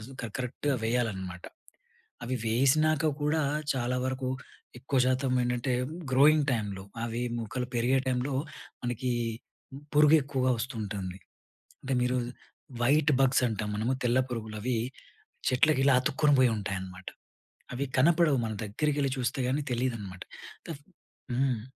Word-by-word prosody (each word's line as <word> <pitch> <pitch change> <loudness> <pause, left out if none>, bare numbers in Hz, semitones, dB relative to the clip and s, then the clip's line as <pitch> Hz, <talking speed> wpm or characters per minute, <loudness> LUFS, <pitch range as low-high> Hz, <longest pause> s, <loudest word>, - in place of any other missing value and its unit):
కర 125 +5 -10
కర 120 - -3
కరెక్ట్‌గా 130 +3 -1
వేయాలనమాట. 95 -7 -2 0.8
అవి 130 +2 -2
వేసినాక 150 +6 +3 0.2
కూడా, 150 +1 +2 0.3
చాలా 125 0 -1
వరకు 130 0 -2 0.5
ఎక్కువ 135 +1 -1
శాతం 130 0 +1
ఏంటంటే 125 +1 -1 0.4
గ్రోయింగ్ 145 +3 +5
టైంలో 100 -5 -2 0.2
అవి 120 +1 -3 0.2
మొక్కలు 120 +2 -3
పెరిగే 125 +3 +3
టైంలో 130 +2 0 0.5
మనకి 120 +1 -1 0.8
పురుగు 150 +1 +6
ఎక్కువగా 135 -2 0
వస్తు 125 +3 -4
ఉంటుంది. 95 -3 -4 0.6
అంటే, 135 - -4
మీరు 125 +1 +1 0.7
వైట్ 150 +4 +4
బగ్స్ 135 -1 +4
అంటాం 105 -1 -3
మనము. 115 +5 0
తెల్ల 120 +1 +3
పురుగులు 110 -2 -5
అవి 125 -1 0 0.7
చెట్లకి 130 +2 +3
ఇలా 140 - +5
అతుక్కుని 145 +2 +2
పోయుంటాయన్నమాట. 95 -6 -1 0.7
అవి 140 +3 -1
కనపడవు 160 -1 +4
మనం 110 -2 -3
దగ్గరికెళ్లి 140 +6 0
చూస్తే 125 +2 -1
గాని 145 +3 0
తెలీదనమాట. 115 -7 -3 0.5
తఫ్ఫ్ 145 -3 -7 0.5
హ్మ్. 130 -3 +1
125 Hz, 125 wpm, -29 LUFS, 115-140 Hz, 0.8 s, పురుగు